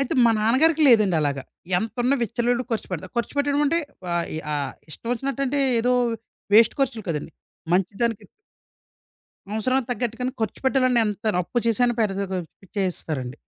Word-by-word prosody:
అయితే 275 - -1
మా 235 - +6
నాన్నగారికి 300 +9 +3
లేదండి 210 -8 +5
అలాగా. 140 -2 -1 0.4
ఎంతున్నా 245 +5 0
విచ్చలవిడిగా 240 +2 0
ఖర్చు 225 - -2
పెడతా. 185 +1 -4
ఖర్చుపెట్టడం 285 +4 0
అంటే 330 +4 +2 0.3
ఆహ్, 170 0 0
ఈ - - -3 0.2
ఆహ్, 140 -2 -2 0.2
ఇష్టమొచ్చినటంటే 275 - -2 0.2
ఏదో 245 +2 +2 0.6
వేస్ట్ 225 +1 +7
ఖర్చులు 260 -5 0
కదండీ. 160 0 -3 0.4
మంచి 185 +1 +2
దానికి 225 -3 0 1.3
అవసరానికి 255 +3 0
తగ్గట్టుగానె 245 +1 -2
ఖర్చు 220 - -2
పెట్టాలంటే, 255 -2 +3
ఎంత 210 +1 -4 0.2
అప్పు 210 - -5
చేసనా 240 +2 +3
పెడతా 200 -2 0
గ - - -2 0.4
చేస్తారండి. 155 -8 -2
230 Hz, 140 wpm, -24 LUFS, 195-255 Hz, 1.3 s, వేస్ట్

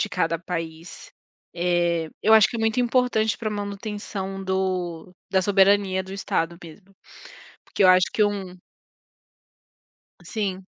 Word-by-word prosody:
de - - 0
cada 165 0 -1
país, 165 -1 -7 0.4
eh, 175 -2 0
eu 220 - +4
acho 220 -2 +7
que 235 - -5
é - - -4
muito 225 +2 0
importante 240 -3 +1
para 220 -2 -3
manutenção 205 -1 -5
do 185 -3 -2 0.2
da 190 -1 +2
soberania 195 -1 +3
do 190 0 -10
estado 170 -3 -2
mesmo. 185 +4 -14 0.7
Porque - - -1
eu - - +7
acho 185 0 +6
que 215 - +2
um 195 -3 -3 1.7
Sim. 195 -4 -4
190 Hz, 135 wpm, -24 LUFS, 175-205 Hz, 1.7 s, acho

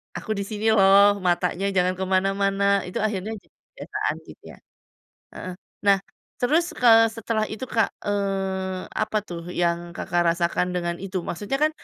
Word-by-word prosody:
aku 220 - -5
di 200 - -2
sini 220 +1 0
loh, 200 0 +6
matanya 180 +1 0
jangan 180 0 +3
kemana-mana." 195 +1 +1
Itu 180 - -4
akhirnya 215 0 -2
jadi 205 - -16
kebiasaan - - -5
gitu - - -14
ya? - - -22 0.8
Heeh, 185 0 -6 0.3
nah 200 -1 +6 0.4
terus, 335 +7 +2
eee, 225 -2 +6
setelah 225 -1 -1
itu, 215 +4 -6
Kak, 225 -3 +2
eee, 195 -2 -2
apa 215 - -1
tuh 170 -3 -8
yang 170 0 -1
Kakak 175 0 0
rasakan 180 +1 0
dengan 175 -1 -2
itu? 190 -1 -4
Maksudnya 205 +10 -3
kan 310 - +4
195 Hz, 150 wpm, -24 LUFS, 180-215 Hz, 0.8 s, loh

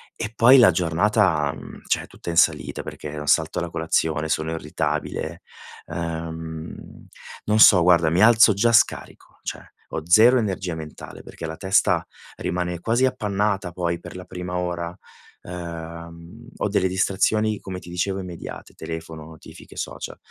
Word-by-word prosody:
E 105 - -5
poi 125 +4 +7
la 115 -7 +7
giornata, 85 -2 +1
mhmm, - - -11
cioè, - - +1
è - - -12
tutta - - -9
in 85 - -4
salita 70 -4 +2
perché 75 0 -7
salto 80 +2 +2
la 85 - -3
colazione, 80 -1 0
sono 80 0 -1
irritabile, 80 +1 -3 0.5
uhm, 80 -1 -6 0.4
non 105 +1 +2
so 100 -4 +8
guarda, 85 -2 +4
mi 85 +3 +2
alzo 115 -1 +7
già 110 +4 +2
scarico. 110 - +1
Cioè, - - -6 0.2
ho 80 - -4
0 115 +8 +7
energia 95 -5 -2
mentale 80 -1 -9
perché 85 - -9
la 80 - -6
testa 95 +4 +2 0.3
rimane 90 -1 -3
quasi 115 +7 +2
appannata 105 -6 -1
poi 85 -1 -2
per - - -11
la 90 0 -8
prima 90 -1 -5
ora, 85 -1 -3 0.5
uhm, 85 +4 -9
ho - - -1
delle 95 -2 +2
distrazioni 105 +3 +1
come 95 -1 -7
ti 90 - -13
dicevo 95 +2 -1
immediate: 90 -3 -8
telefono, 80 -1 -7
notifiche, 80 0 -14
social. - - -6
90 Hz, 150 wpm, -23 LUFS, 80-100 Hz, 0.5 s, so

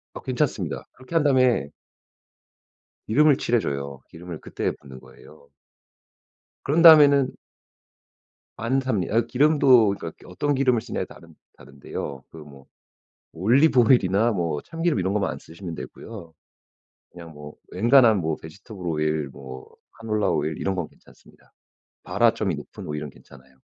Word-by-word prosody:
어 - - -7
괜찮습니다. - - -3
그렇게 130 +6 -11
한 165 - +3
다음에 130 - +2 1.4
기름을 145 +4 +4
칠해줘요. 70 - -2
기름을 85 -1 -9
그때 - - -3
붓는 65 -2 -13
거예요. 70 +2 -18 1.2
그런 155 +5 +2
다음에는 145 -5 +7 1.3
안탑니 125 -6 -1
어 115 +2 +3
기름도 130 -7 +4
그니까 80 - -7
어떤 145 +11 -2
기름을 130 -4 +2
쓰느냐에 115 -5 -4
다른 85 -2 -16 0.2
다른데요. 70 0 -8
그 80 - -12
뭐 70 -3 -14 0.7
올리브 125 - +3
오일이나 110 -1 +3
뭐 85 -6 -2
참기름 165 -4 -2
이런 95 +1 -1
것만 100 -2 0
안 - - -7
쓰시면 85 +1 -9
되고요. 90 -2 -10 0.8
그냥 85 -2 -12
뭐 75 -1 -11 0.2
엔간한 120 +2 +5
뭐 80 -2 -2
베지터블 95 +4 -11
오일, 75 -2 -1
뭐 65 -1 -11 0.3
카놀라 110 -2 -1
오일 80 0 -2
이런 95 - -2
건 90 -4 -3
괜찮습니다. - - -23 0.5
발화점이 - - +1
높은 - - -10
오일은 75 -1 -5
괜찮아요. 65 0 -19
95 Hz, 315 characters per minute, -24 LUFS, 80-130 Hz, 1.4 s, 다음에는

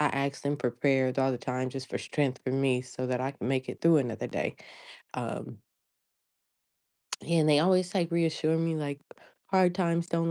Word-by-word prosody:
I 150 - +4 0.2
asked 140 - -10
them 145 +1 0
for 125 - 0
prayers 130 +1 +1
all 135 0 +3
the 125 - -3
time, 130 +1 -2
just 135 0 -6
for - - -2
strength, 135 -4 -1
for 130 - -1
me, 135 -2 +2
so 130 0 -5
that 125 0 0
I 135 +2 -2
can 130 - -5
make 130 -1 0
it - - -6
through 165 -2 +6
another 120 -5 -2
day, - - -3 0.6
um - - -5 1.7
and 160 -2 +3
they 145 -1 +6
always, 185 +3 +3
like, 170 -3 +1
reassure 160 -1 +1
me, 165 0 0
like, 145 -2 -4 0.5
"Hard 185 -2 +3
times 170 -2 +1
don't 165 -1 0
145 Hz, 190 wpm, -29 LUFS, 130-165 Hz, 1.7 s, through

